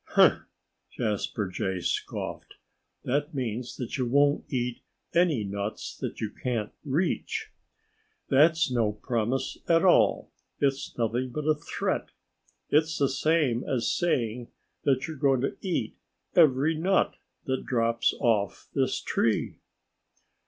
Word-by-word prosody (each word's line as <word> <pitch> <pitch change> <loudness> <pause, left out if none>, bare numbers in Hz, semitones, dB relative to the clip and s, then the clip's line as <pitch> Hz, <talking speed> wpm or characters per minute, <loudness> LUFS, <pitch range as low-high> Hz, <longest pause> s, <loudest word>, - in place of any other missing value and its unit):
"Huh!" - - +6 0.5
Jasper 105 -1 -2
Jay 95 +1 -2
scoffed. - - -4 0.5
"That 145 +4 -1
means 125 -2 -3
that 125 +2 -4
you 125 - +1
won't 140 +3 +2
eat 125 -2 -2 0.3
any 165 -10 +3
nuts 100 +1 -4
that - - -5
you 110 -2 -3
can't 115 -4 -3
reach. 180 - -1 0.8
That's 155 +1 +4
no 115 -4 +1
promise 115 +3 -2
at 165 +1 +4
all. 180 - +4 0.3
It's 135 -1 -1
nothing 120 +2 0
but 150 +4 -4
a 155 - +5
threat. 150 - -3 0.6
It's 155 +2 +3
the 140 -2 +2
same 135 -4 +1
as 125 -3 0
saying 120 -8 0 0.4
that 135 -2 +2
you're 160 -2 -6
going 135 -2 +3
to 135 - -1
eat 185 -4 -2 0.4
every 155 -2 +5
nut 180 +5 +2 0.3
that 130 -3 -2
drops 115 -1 +2
off 105 -4 0
this - - +1
tree." - - 0
130 Hz, 125 wpm, -27 LUFS, 115-155 Hz, 0.8 s, Huh